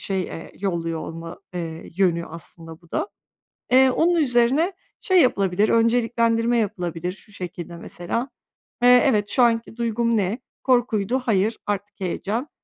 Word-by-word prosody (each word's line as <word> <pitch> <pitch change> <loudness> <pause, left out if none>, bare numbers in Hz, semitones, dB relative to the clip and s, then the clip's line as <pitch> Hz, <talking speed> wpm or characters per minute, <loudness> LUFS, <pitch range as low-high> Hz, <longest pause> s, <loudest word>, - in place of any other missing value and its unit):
şey, 190 -2 -1
eee, 165 - -8
yolluyor 170 -4 -2
olma, 165 +2 -7 0.2
eee, 165 -2 -6
yönü 170 -3 +2
aslında 165 0 -9
bu 170 - -23
da. 410 - -1 0.6
Eee, 260 +1 +6
onun 345 +6 +2
üzerine 275 +5 +3 0.3
şey 370 -2 +4
yapılabilir, 200 -4 +2
önceliklendirme 230 0 +2
yapılabilir. 180 -5 -2
Şu 210 - -17
şekilde 175 -3 -7
mesela: 230 +10 -4 0.5
"Eee, 245 0 +7
evet, 205 -4 +1
şu 250 - +4
anki 230 -1 +1
duygum 235 0 +1
ne? 205 +4 0 0.2
Korkuydu. 245 -2 +2
Hayır, 215 0 +1
artık 205 0 -3
heyecan. 205 - -3
210 Hz, 140 wpm, -23 LUFS, 175-240 Hz, 0.6 s, Eee